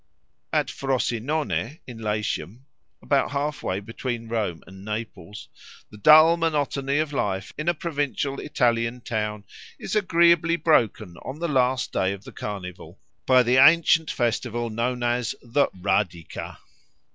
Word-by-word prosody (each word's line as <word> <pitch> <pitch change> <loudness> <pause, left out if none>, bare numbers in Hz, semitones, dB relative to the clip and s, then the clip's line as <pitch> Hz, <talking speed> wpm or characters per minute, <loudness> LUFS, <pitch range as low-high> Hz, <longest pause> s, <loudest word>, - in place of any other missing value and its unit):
At - - 0
Frosinone, 135 +1 -2
in 120 -3 -10
Latium, 110 +2 -3 0.4
about 140 -2 +1
half 145 +1 -2
way 95 +1 -2
between 115 +2 -5
Rome 105 -8 -2
and 95 0 -13
Naples, 105 -2 -7 0.4
the 105 - -12
dull 155 +6 +7
monotony 145 -4 0
of 155 -1 -1
life 95 -7 -2
in 155 +3 -1
a 175 - +1
provincial 145 -3 -2
Italian 120 -4 0
town 105 -2 -3 0.3
is 190 - -5
agreeably 170 -4 +4
broken 110 - +1
on 130 +3 -8
the 170 +2 -2
last 130 -3 +1
day 95 +1 +1
of 100 0 -10
the - - -11
Carnival 90 -3 -7 0.3
by 130 -1 +6
the 125 +2 +2
ancient 165 +2 +5
festival 120 -1 -1
known 120 +2 -2
as 120 -1 0
the 130 +4 +2
_Radica. 90 -2 -3
125 Hz, 135 wpm, -24 LUFS, 105-145 Hz, 0.4 s, dull